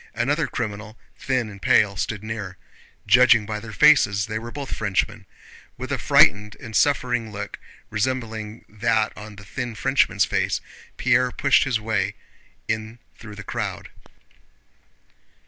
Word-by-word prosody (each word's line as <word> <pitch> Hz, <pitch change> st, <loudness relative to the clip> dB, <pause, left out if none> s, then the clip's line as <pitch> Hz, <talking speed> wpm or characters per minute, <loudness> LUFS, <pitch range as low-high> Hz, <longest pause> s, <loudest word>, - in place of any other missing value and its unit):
Another 140 Hz, +7 st, 0 dB
criminal, 110 Hz, -1 st, -5 dB, 0.2 s
thin 130 Hz, -3 st, -1 dB
and 100 Hz, -2 st, -11 dB
pale, 100 Hz, -1 st, +3 dB
stood 105 Hz, +3 st, -3 dB
near. 105 Hz, -4 st, -6 dB, 0.5 s
Judging 120 Hz, 0 st, +5 dB
by 105 Hz, 0 st, -4 dB
their 110 Hz, 0 st, -9 dB
faces 105 Hz, -7 st, +4 dB
they 110 Hz, 0 st, -4 dB
were 115 Hz, +1 st, -8 dB
both 140 Hz, +2 st, -6 dB
Frenchmen. 105 Hz, 0 st, -2 dB, 0.5 s
With -, -, -6 dB
a -, -, -1 dB
frightened 105 Hz, +1 st, +4 dB
and 110 Hz, -4 st, -8 dB
suffering 120 Hz, -5 st, +1 dB
look 100 Hz, 0 st, -7 dB, 0.3 s
resembling 110 Hz, -1 st, -3 dB
that 110 Hz, +1 st, 0 dB
on 105 Hz, 0 st, -10 dB
the 100 Hz, 0 st, -13 dB
thin 120 Hz, +2 st, -5 dB
Frenchman's -, -, +2 dB
face, -, -, 0 dB, 0.4 s
Pierre 125 Hz, 0 st, +3 dB
pushed 140 Hz, +1 st, +3 dB
his 125 Hz, -5 st, 0 dB
way 110 Hz, 0 st, -1 dB, 0.5 s
in 110 Hz, +1 st, -3 dB, 0.2 s
through 105 Hz, -3 st, -11 dB
the 100 Hz, -, -9 dB
crowd. -, -, -4 dB
110 Hz, 140 wpm, -23 LUFS, 105-120 Hz, 0.5 s, Judging